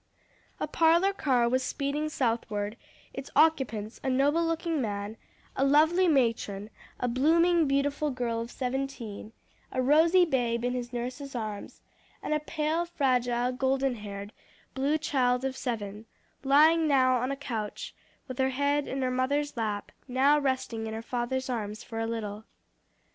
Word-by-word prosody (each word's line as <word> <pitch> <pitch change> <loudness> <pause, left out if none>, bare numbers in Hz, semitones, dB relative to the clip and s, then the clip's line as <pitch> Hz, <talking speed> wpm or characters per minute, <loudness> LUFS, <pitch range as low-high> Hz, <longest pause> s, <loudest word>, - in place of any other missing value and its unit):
A - - 0
parlor 340 +4 +3
car 255 -10 +2
was 255 +2 +1
speeding 285 +3 -2
southward; 225 -6 -1 0.4
its 270 +1 -7
occupants, 255 -9 +2
a 265 - 0
noble 285 +6 +2
looking 330 -2 -1
man, 205 -1 -3 0.4
a 270 - +1
lovely 315 +6 +4
matron, 230 - 0 0.3
a 250 - 0
blooming, 325 +6 +3
beautiful 280 +2 +1
girl 240 -3 -2
of 230 - -6
seventeen, 250 -5 -4 0.4
a 260 - -2
rosy 320 +7 +5
babe 240 -6 0
in 245 - 0
his 245 -1 -4
nurse's 250 +3 -5
arms, 215 -3 -5 0.4
and - - -1
a 305 - +2
pale, 310 +2 -1
fragile, 250 -6 +1
golden 265 +1 0
haired, 205 -2 -7 0.4
blue 275 +3 0
eyed 310 - -2
child 250 -2 +1
of 265 0 -2
seven, 215 -4 -4 0.4
lying 310 +4 +5
now 255 -3 +4
on 250 +2 -1
a 275 - -3
couch 230 -7 -5 0.3
with 255 0 -7
her 265 0 +3
head 285 +2 0
in 265 0 -2
her 255 - 0
mother's 280 +3 0
lap, 215 -3 -3 0.2
now 275 +3 +4
resting 260 -5 -2
in 220 - -4
her 225 - -5
father's 250 +2 -2
arms 215 -4 -4
for 225 - -6
a 225 - -1
little. 215 -2 -4
260 Hz, 155 wpm, -28 LUFS, 230-290 Hz, 0.4 s, rosy